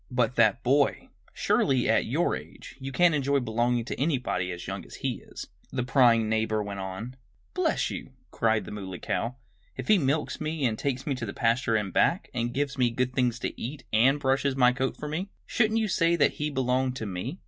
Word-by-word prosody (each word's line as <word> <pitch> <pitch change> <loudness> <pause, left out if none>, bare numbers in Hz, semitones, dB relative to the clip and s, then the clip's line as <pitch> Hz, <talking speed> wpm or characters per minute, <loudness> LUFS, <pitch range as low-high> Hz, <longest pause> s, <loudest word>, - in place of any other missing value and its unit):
"But 125 -2 0
that 110 -3 +3
boy! 140 +3 +2 0.2
Surely, 130 -3 +1
at - - +2
your - - +1
age, - - -10
you 135 0 -5
can't 175 +4 +4
enjoy 140 -1 +2
belonging 120 0 0
to - - -5
anybody 125 - 0
as 85 0 -7
young - - -5
as - - -12
he - - -1
is!" - - -9 0.3
the 125 -2 -1
prying 120 -3 +4
neighbor 110 -1 0
went 100 -1 -6
on. 95 +6 -6 0.4
"Bless - - 0
you!" - - -6 0.2
cried 110 -1 +1
the - - -8
Muley 95 -3 -6
Cow. 120 +7 -2 0.4
"If - - -6
he 210 -2 +6
milks 150 +2 -1
me, 155 -2 -1
and 115 -3 +1
takes 130 +1 -2
me 145 - 0
to 125 -3 -4
the - - -5
pasture 115 0 +1
and 105 -4 -1
back, - - +2
and 120 -1 -1
gives 140 +1 -2
me 125 -1 +4
good 125 +2 -1
things 125 -2 +1
to - - -4
eat, 135 +5 -5
and 130 +7 +4
brushes 135 0 +1
my 125 -2 +5
coat 130 +1 -2
for 150 - -6
me, 170 +7 -3 0.2
shouldn't 220 -1 +1
you 220 - 0
say 170 -3 +2
that 165 - +3
he 150 - 0
belonged 130 -1 0
to 115 - -4
me? 100 - -4
125 Hz, 215 wpm, -27 LUFS, 115-140 Hz, 0.4 s, he